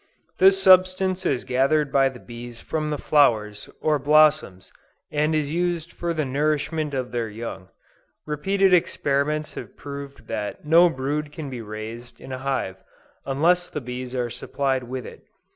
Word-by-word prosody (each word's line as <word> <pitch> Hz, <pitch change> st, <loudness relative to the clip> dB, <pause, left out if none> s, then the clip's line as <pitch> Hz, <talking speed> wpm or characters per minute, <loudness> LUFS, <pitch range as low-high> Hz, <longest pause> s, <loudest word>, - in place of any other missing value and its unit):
This 195 Hz, +1 st, +6 dB
substance 185 Hz, 0 st, +4 dB
is 130 Hz, -3 st, -1 dB
gathered 135 Hz, +3 st, +2 dB
by 135 Hz, -1 st, +4 dB
the 130 Hz, -2 st, -12 dB
bees 120 Hz, 0 st, -10 dB
from 155 Hz, -1 st, -3 dB
the 150 Hz, -, -1 dB
flowers, 110 Hz, -9 st, +2 dB
or 155 Hz, -2 st, +2 dB
blossoms, 150 Hz, -9 st, +3 dB, 0.4 s
and 150 Hz, +1 st, +1 dB
is 150 Hz, -2 st, -1 dB
used 170 Hz, -1 st, -1 dB
for 170 Hz, 0 st, -3 dB
the 155 Hz, -3 st, -1 dB
nourishment 150 Hz, +2 st, -1 dB
of 130 Hz, -1 st, -3 dB
their 120 Hz, -2 st, -2 dB
young. 105 Hz, -4 st, -7 dB, 0.6 s
Repeated 190 Hz, +6 st, +1 dB
experiments 150 Hz, -2 st, +1 dB
have -, -, -9 dB
proved 140 Hz, -1 st, -8 dB
that 105 Hz, +5 st, -5 dB
no 170 Hz, +3 st, +6 dB
brood 145 Hz, +1 st, -3 dB
can 150 Hz, -3 st, -7 dB
be 125 Hz, -2 st, -5 dB
raised 110 Hz, +3 st, -8 dB
in 130 Hz, -, -10 dB
a 130 Hz, -, -4 dB
hive, 130 Hz, -8 st, -2 dB, 0.5 s
unless 175 Hz, +6 st, +2 dB
the -, -, -4 dB
bees 125 Hz, 0 st, -6 dB
are 120 Hz, -2 st, -2 dB
supplied 135 Hz, -1 st, -2 dB
with 125 Hz, -1 st, -5 dB
it. -, -, -11 dB
140 Hz, 160 wpm, -24 LUFS, 125-155 Hz, 0.6 s, This